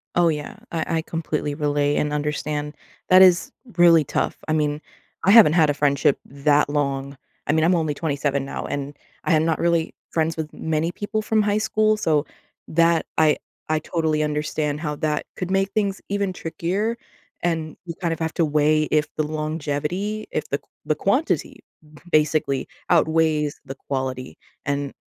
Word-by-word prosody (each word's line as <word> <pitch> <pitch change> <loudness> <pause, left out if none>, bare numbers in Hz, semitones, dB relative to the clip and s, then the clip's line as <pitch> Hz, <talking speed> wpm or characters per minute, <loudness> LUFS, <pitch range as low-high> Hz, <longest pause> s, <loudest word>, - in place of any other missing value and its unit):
Oh, 175 -1 +4
yeah, 150 -2 -4 0.2
I 165 0 -1
I - - 0
completely 155 -3 -3
relate 145 -1 +1
and 150 0 0
understand. 150 0 -2 0.3
That 185 +1 +8
is, 180 -2 +5 0.3
really 170 -3 +7
tough, - - -1
I 155 - +1
mean, 150 -1 0 0.4
I 195 - +5
haven't 210 -9 +8
had 160 -4 +4
a - - +2
friendship 140 -1 +2
that 145 +1 +2
long. 140 -1 -2 0.3
I - - +3
mean, 160 0 +3
I'm 180 +1 +4
only 155 -3 0
27 140 -2 -1
now, - - -5
and, 145 0 -4 0.3
I 175 - +4
am 155 0 +4
not 165 -1 +1
really 170 -1 +1 0.2
friends 160 0 0
with 155 -1 -4
many 160 +1 -1
people 210 +3 -3
from 215 0 +2
high 205 0 +1
school, 215 0 +2
so, 155 -6 +1 0.4
that 165 0 +3
I 155 -1 +4 0.3
I 155 0 +1
totally 155 -2 0
understand 150 0 -1
how 150 -2 -3
that 150 -1 -1
could 185 0 -4
make 195 0 +1
things 200 -3 0
even 200 -1 -1
trickier, 185 +7 -2 0.5
and, 160 -2 -1
you 170 - -5
kinda 170 -3 -1
have 160 -1 -2
to 165 - +2
weigh 155 +1 +3
if 150 0 +2
the 155 - +2
longevity, 155 +7 -3
if 155 0 -2
the 140 - -1
q - - -35 0.2
the 155 - +1
quantity, 255 +11 0 0.5
basically 150 -3 +2 0.2
outweighs 160 -3 +2
the 135 - -7
quality. 130 -1 -4 0.3
And, 140 -1 -2
155 Hz, 170 wpm, -23 LUFS, 145-170 Hz, 0.5 s, That